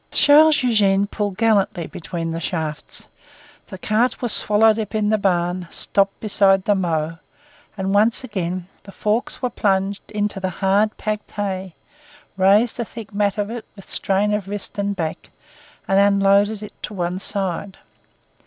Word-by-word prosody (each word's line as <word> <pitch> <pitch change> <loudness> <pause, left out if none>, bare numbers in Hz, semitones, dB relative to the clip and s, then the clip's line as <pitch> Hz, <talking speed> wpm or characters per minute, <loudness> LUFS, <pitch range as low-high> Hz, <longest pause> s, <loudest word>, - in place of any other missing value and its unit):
Charles 300 0 +5
Eugene 200 -5 +3
pulled 205 -2 -3
gallantly 200 -6 +1
between 165 0 -5
the 165 - -3
shafts; 160 -3 -4 0.6
the 190 - -9
cart 220 +6 0
was 240 -3 -1
swallowed 215 +1 +3
up 220 0 -4
in 210 -1 +1
the 215 - +3
barn, 180 -2 0
stopped 195 0 0
beside 195 -3 +3
the 205 - +3
mow, 165 -4 -1 0.6
and 190 0 -1
once 220 +5 +3
again 185 -6 -4
the 200 - -13
forks 215 +6 -2
were 250 - +1
plunged 195 -1 -1
into 210 -1 -2
the 190 0 -2
hard 195 +4 +1
packed 210 -1 -4
hay, 190 -3 -4 0.6
raised 200 +6 +3
a - - +1
thick 225 -2 -10
mat 205 0 0
of 205 +1 -2
it 235 -1 -5
with 195 - -14
strain 200 +2 0
of 210 -2 -2
wrist 205 0 -5
and 200 0 -1
back, 160 -3 -4 0.6
and 195 0 +3
unloaded 200 +1 +3
it 210 - -9
to 210 - -6
one 180 0 -2
side. 195 -1 -3
200 Hz, 160 wpm, -21 LUFS, 190-210 Hz, 0.6 s, Charles